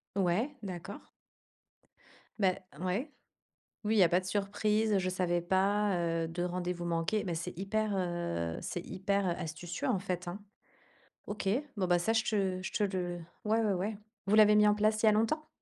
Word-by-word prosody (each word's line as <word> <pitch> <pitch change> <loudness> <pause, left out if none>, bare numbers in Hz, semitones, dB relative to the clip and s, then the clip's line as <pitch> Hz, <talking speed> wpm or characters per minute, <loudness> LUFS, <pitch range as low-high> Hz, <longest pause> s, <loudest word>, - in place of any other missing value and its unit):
Ouais, 200 +9 +1
d'accord. 185 0 -7 1.3
Beh 190 -3 +2 0.2
ouais. 190 - -2 0.7
Oui, 215 +1 +1
il - - +5
y - - +8
a 170 - +4
pas 180 +3 +3
de - - -12
surprise, 210 +2 +1
je 185 -1 0
savais 180 -1 0
pas, 195 +3 +2
heu, 165 -1 0
de 175 +2 -3
rendez-vous 180 -1 -2
manqués, 170 +6 0
mais 170 -3 -2
c'est 165 0 -5
hyper, 215 +2 0
heu 170 - -2
c'est - - -4
hyper 195 +1 0
astucieux 175 - -4
en 200 -7 +2
fait, 180 -1 -3
hein. 180 +4 -6 0.9
OK, 205 -1 -4 0.3
bon 190 - +1
bah, 175 -1 +4
ça, 220 - +1
je 225 - +3
te 195 -5 0
je - - -4
te - - +1
le 180 -3 -2 0.3
ouais 220 +2 +3
ouais 210 - +2
ouais. 200 +3 -2 0.3
Vous 210 - +4
l'avez 210 -1 +7
mis 210 0 +6
en 210 - +5
place 215 +1 +2
il - - +6
y - - +8
a - - +5
longtemps? 225 +9 +1
190 Hz, 190 wpm, -32 LUFS, 175-210 Hz, 1.3 s, y